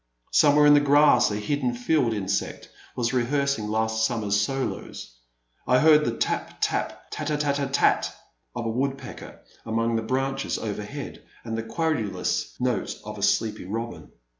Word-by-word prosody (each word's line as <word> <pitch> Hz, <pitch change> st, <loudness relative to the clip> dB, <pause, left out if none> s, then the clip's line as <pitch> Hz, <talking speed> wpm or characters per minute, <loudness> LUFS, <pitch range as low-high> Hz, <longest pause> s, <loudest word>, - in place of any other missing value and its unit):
Somewhere 150 Hz, 0 st, +5 dB
in 145 Hz, -, +8 dB
the 145 Hz, -, +7 dB
grass 145 Hz, -3 st, +5 dB
a 105 Hz, -, -2 dB
hidden 125 Hz, +3 st, -1 dB
field 125 Hz, 0 st, +1 dB
insect 105 Hz, -4 st, -3 dB, 0.3 s
was 120 Hz, 0 st, -1 dB
rehearsing 135 Hz, -2 st, 0 dB
last 110 Hz, +1 st, 0 dB
summer's 105 Hz, -4 st, +1 dB
solos; 130 Hz, -, -4 dB, 0.5 s
I 125 Hz, -, +5 dB
heard 150 Hz, +1 st, +5 dB
the 115 Hz, -, -2 dB
tap! -, -, -2 dB
tap! -, -, -2 dB
tat -, -, -4 dB
tat 150 Hz, -2 st, 0 dB
t 145 Hz, -, -1 dB
t 135 Hz, -, -7 dB
tat! 140 Hz, -, +2 dB, 0.4 s
of 120 Hz, -1 st, -3 dB
a -, -, 0 dB
woodpecker 135 Hz, +2 st, -4 dB, 0.2 s
among 115 Hz, +1 st, 0 dB
the -, -, -1 dB
branches 135 Hz, +3 st, -1 dB
overhead 105 Hz, +6 st, -6 dB, 0.2 s
and 115 Hz, -1 st, -4 dB
the 115 Hz, -, -2 dB
querulous 135 Hz, -, -2 dB
note 125 Hz, -6 st, -1 dB
of -, -, -7 dB
a -, -, -7 dB
sleepy 110 Hz, -3 st, +1 dB
robin. 105 Hz, -5 st, -5 dB
120 Hz, 160 wpm, -25 LUFS, 110-140 Hz, 0.5 s, in